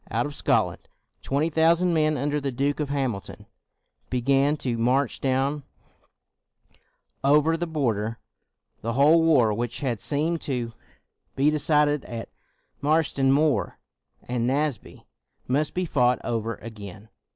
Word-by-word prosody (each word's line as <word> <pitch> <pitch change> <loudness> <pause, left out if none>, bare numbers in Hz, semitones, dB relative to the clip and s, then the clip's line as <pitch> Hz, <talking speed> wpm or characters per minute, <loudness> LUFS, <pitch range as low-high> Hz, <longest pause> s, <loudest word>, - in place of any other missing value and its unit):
Out 115 +2 0
of 145 - -5
Scotland, - - 0 0.3
twenty 150 +4 0
thousand 170 +3 +3
men 155 -1 +2
under 145 +2 -1
the 140 -1 -2
Duke 140 +4 -1
of 150 -2 -2
Hamilton 130 -8 -3 0.6
began 135 +4 +2
to 125 -4 -2
march 125 +3 +1
down 135 +2 0 1.6
over 150 +3 +4
the 175 +1 -3
border. 115 -8 -1 0.6
The 115 +2 -2
whole 150 +6 +5
war 135 -10 +4
which 120 +4 -3
had 125 -6 -1
seemed 155 +6 -1
to 120 -4 -3 0.6
be 140 +3 +3
decided 150 -1 +2
at 115 -1 -7 0.5
Marston 145 -2 +2
Moor 145 +1 +1 0.5
and 120 -1 -2
250 130 - +2
CROMWELL 150 +2 +2
Naseby 145 -6 -7 0.4
must 145 +4 0
be 180 0 0
fought 125 -6 +2
over 115 -1 -2
again. 105 -2 -10
140 Hz, 135 wpm, -25 LUFS, 120-150 Hz, 1.6 s, whole